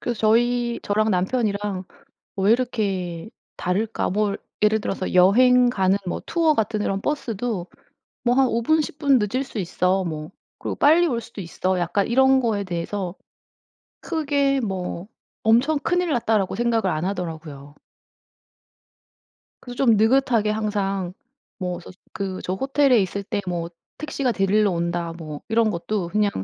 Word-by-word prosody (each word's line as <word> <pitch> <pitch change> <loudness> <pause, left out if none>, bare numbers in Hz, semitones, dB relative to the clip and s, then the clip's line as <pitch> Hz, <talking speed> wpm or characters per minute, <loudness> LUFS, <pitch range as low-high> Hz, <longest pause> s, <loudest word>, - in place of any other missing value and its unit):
그래서 240 -3 -3
저희 235 +2 +2
저랑 215 +2 +1
남편이랑 200 -1 -1 0.5
'왜 195 +3 +3
이렇게 200 -7 -1 0.3
다를까?' 210 +5 -1
뭐 205 +1 0 0.3
예를 215 +1 +3
들어서 190 -2 -3
여행 245 +7 +5
가는 190 -4 +2
뭐 - - -3
투어 325 -2 +2
같은 215 -1 0
이런 195 -1 -1
버스도 230 -9 -2 0.6
'뭐 245 0 +3
한 265 0 +4
5 235 0 0
분 315 +5 +3
10 295 - -5
분 280 -4 +4
늦을 235 +6 -1
수 230 - -8
있어. 185 +1 0
뭐 155 -2 -5 0.3
그리고 - - -4
빨리 330 +4 +5
올 240 -6 -1
수도 230 -3 -10
있어.' 185 +1 -2
약간 175 +3 0
이런 265 +2 +4
거에 215 -4 0
대해서 180 +1 -4 0.9
크게 285 -4 0
뭐 190 -3 -4 0.3
'엄청 245 +8 +3
큰일 355 +3 0
났다.'라고 220 -5 +1
생각을 235 -3 +1
안 155 +2 -2
하더라고요. 160 -6 -5 1.9
그래서 245 -1 -9
좀 235 -5 +4
느긋하게 225 -1 +3
항상 195 -4 -1 0.5
뭐 180 -2 -3
스스 180 - -13 0.2
그 190 -1 -4
저 185 - -2
호텔에 270 +1 +3
있을 200 +1 -2
때 205 +1 -3
뭐 170 -1 -2 0.3
'택시가 280 -5 -1
데리러 200 +1 +2
온다.' 170 -1 -2
뭐 155 -3 -7
이런 225 0 +2
것도 180 0 -3
그냥 210 +1 +1
210 Hz, 280 characters per minute, -23 LUFS, 185-245 Hz, 1.9 s, 여행